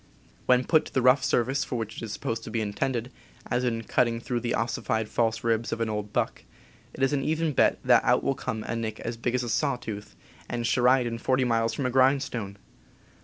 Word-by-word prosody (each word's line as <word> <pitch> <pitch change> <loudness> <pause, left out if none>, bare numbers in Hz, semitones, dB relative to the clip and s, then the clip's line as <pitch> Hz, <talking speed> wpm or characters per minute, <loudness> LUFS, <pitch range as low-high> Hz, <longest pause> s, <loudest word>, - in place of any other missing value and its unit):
When 125 0 +5
put 155 +3 +3
to - - -11
the 130 - +3
rough 130 +1 +5
service 130 +2 +1
for - - -5
which 110 -1 -5
it - - -6
is 110 - -7
supposed 115 +2 -3
to - - -6
be 115 - -1
intended, 115 +4 -2 0.4
as 125 - +1
in 115 -2 -1
cutting 115 +1 +1
through 120 +1 -2
the 120 0 -1
ossified 110 -1 -1
false 115 0 0
ribs 115 0 0
of - - -2
an 115 -1 -1
old 105 -1 -4
buck, - - -1 0.5
it 135 - -2
is 135 - +2
an 135 -2 0
even 160 0 0
bet - - +3
that - - +5
out - - +3
will 135 - +1
come 110 -4 -4
a 115 - -3
nick 110 -1 -4
as 115 - -4
big 120 +2 -2
as 125 - 0
a 120 - -4
saw 140 +3 +1
tooth 110 -4 -8 0.2
— - - -25
and 120 -1 -2
Sheridan 125 -1 +2
forty 130 +2 +1
miles 115 -2 +1
from 140 - -2
a 130 - 0
grindstone! 130 -6 +1
120 Hz, 230 wpm, -27 LUFS, 115-130 Hz, 0.5 s, When